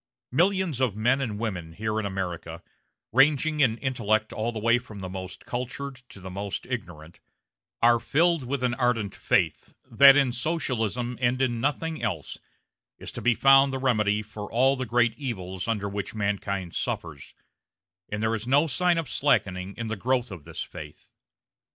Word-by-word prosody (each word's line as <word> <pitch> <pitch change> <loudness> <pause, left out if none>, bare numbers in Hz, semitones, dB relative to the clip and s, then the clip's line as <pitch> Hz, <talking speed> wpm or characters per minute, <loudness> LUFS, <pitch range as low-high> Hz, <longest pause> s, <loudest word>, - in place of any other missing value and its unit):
Millions 175 -1 +1
of 120 -6 +1
men 120 +6 +2
and 110 -6 -3
women, 95 -7 -4
here 110 +3 -2
in 105 - -2
America 90 -3 -5 0.5
ranging 150 +4 +3
in 120 -6 +3
intellect 110 -4 0
all 110 +2 -2
the 115 - -7
way 115 +3 +3
from 115 -4 -12
the 95 - -5
most 95 -1 -7
cultured 130 +2 -5
to - - -12
the 95 0 -8
most 100 +1 -4
ignorant 85 -10 -7 0.6
are 120 0 +6
filled 165 +6 +2
with 130 +1 -3
an 125 -1 +1
ardent 120 -5 0
faith - - 0
that 135 +4 +7
in 135 -3 +3
Socialism, 125 - -2
and 125 +1 +2
in 120 -3 0
nothing 155 +3 -1
else, 95 - -3 0.6
is - - -8
to - - -7
be 120 -1 +3
found 135 +1 +6
the 135 - -2
remedy 105 -5 +1
for 105 -1 -8
all 130 +4 +3
the 130 -2 -4
great 120 0 +2
evils 95 -9 -4
under 105 -3 -1
which 100 +1 -5
mankind 100 -3 -2
suffers; - - -4 0.7
and 105 +1 -3
there 110 0 +1
is 115 +1 -4
no 140 +4 +4
sign 175 +4 +2
of 165 -3 -2
slackening 95 -9 0
in 115 - -3
the 110 0 -3
growth 125 +2 0
of 85 -6 -9
this 80 - -5
faith. - - -11
115 Hz, 175 wpm, -26 LUFS, 100-130 Hz, 0.7 s, that